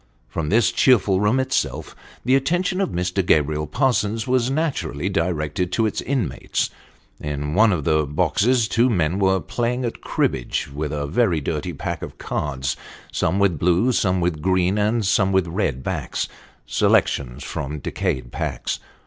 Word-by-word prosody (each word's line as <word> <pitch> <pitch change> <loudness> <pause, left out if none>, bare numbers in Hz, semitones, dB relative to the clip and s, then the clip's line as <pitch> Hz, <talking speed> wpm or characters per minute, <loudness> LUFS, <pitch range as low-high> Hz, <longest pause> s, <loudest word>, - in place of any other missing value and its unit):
From 75 -2 -3
this 110 0 +4
cheerful 100 -7 +4
room 105 +6 +2
itself, 130 - -1 0.3
the 130 - +3
attention 180 +7 +1
of 195 - 0
Mr. 90 +2 -1
Gabriel 75 -2 +2
Parsons 110 - +1
was 125 -1 +1
naturally 135 - -1
directed 85 -2 -1
to 115 - +2
its 110 - -1
inmates. 120 - -1 0.5
In 75 0 -3
one 110 +4 +5
of 85 -6 -1
the 75 0 +2
boxes 100 - +2
two 120 +3 +3
men 90 -3 +1
were 95 -1 +3
playing 125 +4 -2
at 115 - -4
cribbage 60 -2 -1
with 75 +1 -3
a 75 -1 -2
very 85 +1 +2
dirty 70 - -3
pack - - -4
of - - -7
cards, 65 -2 -2 0.4
some 85 +4 0
with 100 -6 +2
blue, 90 +8 +3
some 95 -6 +1
with 85 -3 -1
green, 95 +3 +2
and 110 +1 +1
some 95 0 +3
with 95 -1 +3
red 80 - -2
backs - - -2 0.4
selections 65 0 +1
from 75 0 -4
decayed - - -3
packs. - - -3
95 Hz, 155 wpm, -22 LUFS, 75-115 Hz, 0.5 s, one